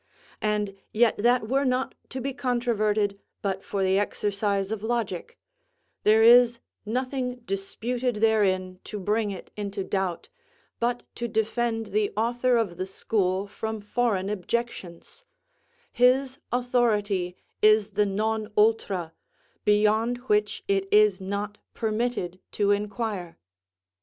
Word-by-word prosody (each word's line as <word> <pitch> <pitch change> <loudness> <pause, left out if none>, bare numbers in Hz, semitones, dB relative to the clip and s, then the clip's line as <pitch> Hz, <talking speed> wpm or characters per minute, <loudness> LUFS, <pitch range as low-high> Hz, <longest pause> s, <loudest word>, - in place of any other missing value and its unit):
And 210 -2 0 0.2
yet 230 +1 +3
that 240 +1 +3
were 270 +4 +2
not 255 0 0 0.2
to 260 - -5
be 270 +2 -3
controverted 215 -6 0 0.2
but 195 -1 -2
for 200 -1 -2
the 190 +1 +3
exercise 200 -1 -1
of 220 -2 -3
logic; 220 -6 -3 0.7
there 220 +1 +5
is 240 0 +7 0.3
nothing 250 +1 -2
disputed 235 +5 -2
therein 195 -4 +2
to 210 - -5
bring 210 +2 0
it 190 -3 -8
into 200 -1 -4
doubt, 190 -3 -2 0.5
but 240 +1 0
to 235 - -2
defend 225 +1 0
the 210 -1 +1
author 240 +2 +2
of 200 -7 -1
the 185 - -3
school 190 -1 0
from 220 +2 -5
foreign 210 -2 0
objections; 210 - -4 0.7
his 260 +2 +3
authority 215 -7 +1 0.3
is 215 0 +5
the 205 +1 +2
non 215 +2 -1
ultra, 205 -6 +2 0.5
beyond 215 +3 +3
which 210 -3 +1
it 195 -1 +1
is 210 -2 +5
not 200 +2 -4 0.2
permitted 220 -5 -2
to 205 -1 +2
inquire. 205 -3 -2
215 Hz, 120 wpm, -26 LUFS, 200-235 Hz, 0.7 s, is